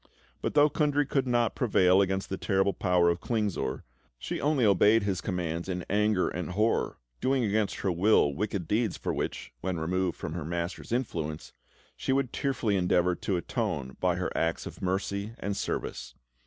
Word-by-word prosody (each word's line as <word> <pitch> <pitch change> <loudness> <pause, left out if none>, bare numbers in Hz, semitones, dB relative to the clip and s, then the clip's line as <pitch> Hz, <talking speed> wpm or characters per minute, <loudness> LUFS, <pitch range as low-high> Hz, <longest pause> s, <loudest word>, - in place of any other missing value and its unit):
But - - -2
though 145 0 +7
Kundry 145 -1 +1
could 135 -1 0
not 120 -2 +2
prevail 95 -6 +4
against 95 0 -1
the 95 - -2
terrible 95 0 +1
power 90 -2 +3
of 85 - -4
Klingsor, 105 -5 -1 0.3
she - - -4
only 140 -3 +2
obeyed 105 +2 +5
his 95 -2 -1
commands 85 -2 -3
in 90 -1 -3
anger 105 -2 +2
and 90 -2 -4
horror, 110 +4 +1 0.2
doing 130 - +1
against 105 -1 +1
her 95 - +1
will 90 -4 +3
wicked 100 0 -3
deeds 110 0 0
for - - -2
which, - - -4
when 95 -2 -2
removed 90 +2 -1
from 80 - -5
her 85 -2 -4
master's 85 +5 -4
influence, 80 -11 -3 0.4
she - - -2
would 135 -2 0
tearfully 125 -7 0
endeavour 90 -1 +2
to 90 +2 -2
atone 65 -5 -3
by 90 -1 +2
her 90 0 -3
acts 80 0 0
of - - -9
mercy 100 +3 -2
and 100 0 -3
service. - - -4
95 Hz, 175 wpm, -29 LUFS, 90-110 Hz, 0.4 s, though